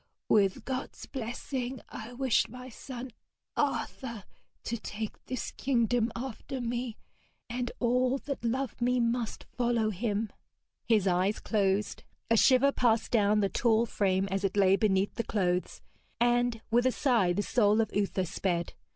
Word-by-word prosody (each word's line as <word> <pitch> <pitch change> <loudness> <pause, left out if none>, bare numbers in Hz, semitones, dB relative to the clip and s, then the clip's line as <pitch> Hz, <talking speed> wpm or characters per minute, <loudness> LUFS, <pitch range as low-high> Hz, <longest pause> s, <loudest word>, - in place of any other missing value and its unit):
With 195 -3 +3
God's 260 0 -4
blessing 250 +1 -4
I 220 +3 -8
wish 255 -2 +2
my 250 +2 -9
son 255 +1 -8 0.4
Arthur 235 -6 -2 0.4
to 235 - -2
take 215 0 -6
this 255 -1 -3
kingdom 240 -3 +1
after 260 +2 -5
me, 240 -1 -3 0.5
and 245 +1 -3
all 250 +2 +2
that 275 -2 -5
love 250 +1 -2
me 250 +1 +2
must 235 -1 -1
follow 235 -3 +1
him.' 210 +1 -2 0.6
His 215 -4 +3
eyes 185 +3 +2
closed, 200 -1 0 0.3
a - - +6
shiver 260 +4 +5
passed 230 -4 +1
down 210 -2 +3
the 200 - +3
tall 230 +1 +2
frame 195 -3 +1
as 195 +1 -1
it 195 +1 0
lay 195 -1 +5
beneath 195 -2 +2
the 230 - -2
clothes, 180 -5 -1 0.4
and 240 -1 +2
with 240 +2 +4
a - - +3
sigh 235 -10 +2
the 200 +4 0
soul 210 -2 +3
of 220 -2 0
Uther 200 -2 0
sped. 175 -1 -2
230 Hz, 150 wpm, -30 LUFS, 205-245 Hz, 0.6 s, a